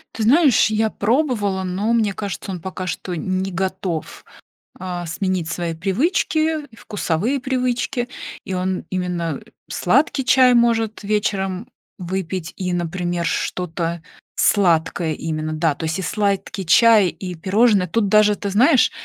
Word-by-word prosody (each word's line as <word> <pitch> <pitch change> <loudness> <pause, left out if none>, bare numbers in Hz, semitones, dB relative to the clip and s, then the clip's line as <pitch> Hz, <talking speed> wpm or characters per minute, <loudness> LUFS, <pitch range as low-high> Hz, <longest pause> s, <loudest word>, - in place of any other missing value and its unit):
Ты 225 - -2
знаешь, 265 -1 +5
я 220 0 +1
пробовала, 215 -5 0
но 195 +5 -1
мне 215 -3 +2
кажется, 200 0 -5
он 180 - -5
пока 185 0 -5
что 180 0 -4
не 185 +3 -2
готов, 185 -3 -3 0.5
а, 180 -1 -4
сменить 180 0 -2
свои 170 0 -3
привычки 310 - 0
и - - -16
вкусовые 205 - -2
привычки, 250 -1 -1 0.4
и 190 - -4
он 185 0 -2
именно, 175 -4 -2
э, - - -21 0.2
сладкий 270 - +1
чай 255 -1 +5
может 230 -3 +2
вечером 200 0 -1 0.3
выпить 185 -1 -4
и, 180 -1 -3
например, 175 0 -2
что-то 170 0 -2 0.3
сладкое 170 -4 +2
именно, 155 0 -3
да. 155 -1 +1
То - - -7
есть 160 +4 -2
и - - -2
сладкий 200 0 -1
чай, 220 +3 +6
и 180 +1 -7
пирожные. 195 +2 +2
Тут 205 +5 0
даже, 210 0 +5
ты 200 0 -4
знаешь, 255 +7 +4
190 Hz, 140 wpm, -21 LUFS, 175-225 Hz, 0.5 s, чай